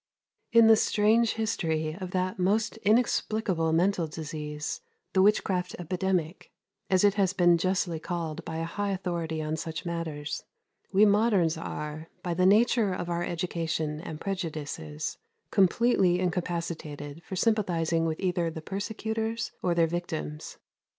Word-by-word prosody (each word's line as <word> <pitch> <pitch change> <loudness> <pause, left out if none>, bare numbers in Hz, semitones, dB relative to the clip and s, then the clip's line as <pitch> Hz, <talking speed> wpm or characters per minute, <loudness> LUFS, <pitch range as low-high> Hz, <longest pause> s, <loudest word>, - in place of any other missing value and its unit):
80. 230 - +6
In 230 - +8
the 225 - +8
strange 220 +2 +3
history 160 -8 -1
of 185 - -4
that 185 +2 -1
most 215 +5 +1
inexplicable 215 -5 +1
mental 175 +1 +2
disease, 150 -1 -5 0.3
the 190 - +4
witchcraft 190 -3 +2
epidemic, 180 -1 -2 0.4
as 185 -1 +3
it 205 -1 +5
has 195 -3 +1
been 175 -2 +5
justly 175 -1 0
called 165 -1 -4
by 160 -1 -5
a 165 - -2
high 205 +5 -2
authority 170 -4 -2
on 155 +1 -1
such 160 +2 -5
matters, 165 -3 -4 0.5
we 200 +2 +6
moderns 200 -5 +3
are, 155 -1 -6
by 175 - -1
the 185 +2 +3
nature 220 0 +4
of 175 -1 -3
our 170 0 -1
education 165 -3 -2
and 155 -2 -7
prejudices, 155 - -4 0.3
completely 190 -2 +3
incapacitated 170 -4 -3
for 190 - -6
sympathizing 175 -6 +1
with 160 -1 -2
either 175 -3 0
the 160 - -6
persecutors 220 +5 -3
or 175 -1 +1
their 170 -1 +4
victims. 115 - -4
175 Hz, 140 wpm, -28 LUFS, 160-195 Hz, 0.5 s, In